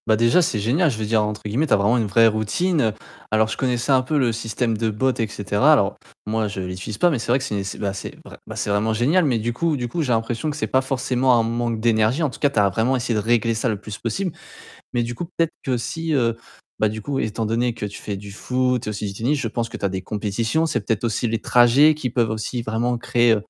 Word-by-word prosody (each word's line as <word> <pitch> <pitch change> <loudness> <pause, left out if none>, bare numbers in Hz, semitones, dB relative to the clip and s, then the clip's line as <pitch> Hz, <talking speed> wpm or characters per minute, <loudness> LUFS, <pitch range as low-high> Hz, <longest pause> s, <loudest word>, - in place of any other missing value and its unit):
Bah, 110 - +4
déjà 115 +11 +4
c'est 140 -9 0
génial 130 - +2
je 120 - -3
veux 110 - -2
dire, 110 +1 +2
entre 105 0 -3
guillemets, 125 +10 0
tu - - +2
as - - +8
vraiment 105 +5 +2
une 115 -3 0
«vraie 115 +3 +5
routine». 115 - +1 0.4
Alors 110 0 +3
je - - -4
connaissais 125 +1 0
un 130 -1 +5
peu 150 +4 -1
le 125 -4 +2
système 115 +1 -2
de 110 +1 0
bot 130 +5 +1
et 115 - +1
cetera. 105 +7 +2
Alors 105 -9 +3 0.3
moi 110 0 0
je 100 -1 -5
l'utilise 95 +3 -5
pas 175 - +4
mais 140 - 0
c'est - - -5
vrai 125 - +5
que - - -6
c'est 100 -4 -2
c'est, 95 - -5
bah, 100 -2 -2
c'est 95 - -7
vrai - - -12
bah, - - -7
vraiment 105 +2 +1
génial 145 +12 +3
mais 130 -5 +2
du 115 +2 -2
coup 155 +4 0
du 120 -2 -3
coup 165 +8 -3
j'ai 135 -5 -1
l'impression 115 +5 -1
que 150 - -4
c'est - - -1
pas 130 - +2
forcément 130 -1 +1
un - - +2
manque 115 0 -1
d'énergie, 115 +6 +2
en 150 - +2
tout - - -11
cas, 145 - +3
tu 140 - -9
as 100 -1 +4
vraiment 115 +7 +1
essayé 125 -1 -1
de - - -3
régler 115 +1 +2
ça 115 +2 -1
le 105 -3 -2
plus 105 0 -8
possible. 170 - -2 0.6
Mais 120 - +1
du 120 +1 -4
coup, 175 - -4
peut-être 165 -1 -1
que 130 -2 0
si 160 +7 -3
heu, 120 -5 +2 0.4
bah, 110 - +3
du 110 +1 -6
coup, 140 - -5
oui, - - 0
étant 110 +1 -3
donné 115 +2 0
que 105 - -5
tu 100 0 -7
fais 100 -2 -4
du 100 +1 -9
foot 125 +2 -1
et - - 0
aussi 105 0 -4
du 100 - -4
tennis, 130 +9 0
je 120 - -1
pense 115 +1 -3
que - - -7
tu - - -3
as - - +2
des 95 0 -4
compétitions. 110 - -1
C'est 155 -7 -1
peut-être 115 +1 0
aussi 115 +1 0
les 115 0 -1
trajets 125 +6 +5
qui 140 -4 -3
peuvent 120 -2 +1
aussi 110 +3 -3
vraiment 115 +2 -1
créer, 120 -1 +3
115 Hz, 280 wpm, -22 LUFS, 110-130 Hz, 0.6 s, as